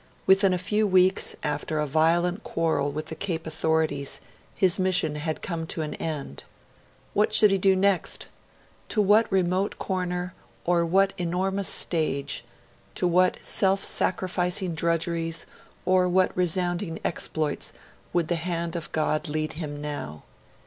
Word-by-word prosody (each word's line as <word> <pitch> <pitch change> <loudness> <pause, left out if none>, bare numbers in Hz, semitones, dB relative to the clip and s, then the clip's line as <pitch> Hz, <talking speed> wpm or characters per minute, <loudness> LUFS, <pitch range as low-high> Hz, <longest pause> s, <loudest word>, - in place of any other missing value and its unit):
Within 190 0 +5
a 180 - +1
few 210 +4 +1
weeks, 185 0 +3
after 150 +1 -2
a 150 - +1
violent 170 +6 +1
quarrel 160 -3 0
with 155 +2 -4
the 160 - -7
Cape 170 -4 -3
authorities, 160 -3 0 0.4
his 190 +1 +3
mission 185 -5 +2
had 155 +1 -4
come 165 -3 -3
to 160 - -3
an 150 - -4
end. 145 - -5 0.7
What 210 +1 +2
should 210 -2 +6
he 195 - +2
do 190 0 +4
next? 195 -1 +1 0.6
To 215 - 0
what 210 +2 +4
remote 185 +1 0
corner 180 -1 -3 0.3
or 170 -1 +2
what 195 +3 +3
enormous 190 +3 -1
stage, 145 -6 +1 0.5
to 180 - +1
what 180 +1 +3
self 195 0 +4
sacrificing 180 -1 0
drudgeries 165 0 -1 0.4
or 185 0 +3
what 185 +1 +2
resounding 175 0 -1
exploits, 155 -3 -1 0.4
would 170 -2 0
the 175 - 0
hand 170 0 -3
of 170 - -5
God 155 +1 0
lead 155 +1 -2
him 150 -2 -6
now? 145 - -6
175 Hz, 140 wpm, -26 LUFS, 160-185 Hz, 0.7 s, should